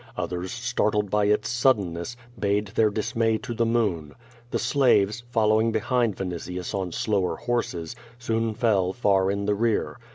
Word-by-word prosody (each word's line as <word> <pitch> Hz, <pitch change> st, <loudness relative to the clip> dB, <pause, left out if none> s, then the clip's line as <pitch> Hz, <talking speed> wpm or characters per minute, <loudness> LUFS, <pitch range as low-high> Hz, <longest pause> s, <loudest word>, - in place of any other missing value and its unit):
Others 90 Hz, +1 st, -3 dB
startled 105 Hz, -4 st, 0 dB
by 105 Hz, -1 st, +2 dB
its 105 Hz, +1 st, +2 dB
suddenness, 115 Hz, -5 st, 0 dB, 0.2 s
bayed 100 Hz, 0 st, 0 dB
their 110 Hz, +1 st, +2 dB
dismay 110 Hz, +1 st, 0 dB
to 120 Hz, -, -6 dB
the 115 Hz, 0 st, +1 dB
moon. 100 Hz, -11 st, 0 dB, 0.3 s
The -, -, -1 dB
slaves, 120 Hz, -6 st, +2 dB
following 110 Hz, -1 st, +3 dB
behind 115 Hz, -1 st, 0 dB
Vin 95 Hz, -2 st, -3 dB
itius 90 Hz, +1 st, -5 dB
on 95 Hz, -3 st, -2 dB
slower 100 Hz, 0 st, 0 dB
horses, 120 Hz, -7 st, -3 dB, 0.2 s
soon 115 Hz, -2 st, -1 dB
fell 100 Hz, -6 st, +1 dB
far 95 Hz, -4 st, +2 dB
in 100 Hz, 0 st, -1 dB
the 105 Hz, -, +2 dB
rear. 115 Hz, +2 st, 0 dB
105 Hz, 155 wpm, -25 LUFS, 95-115 Hz, 0.3 s, following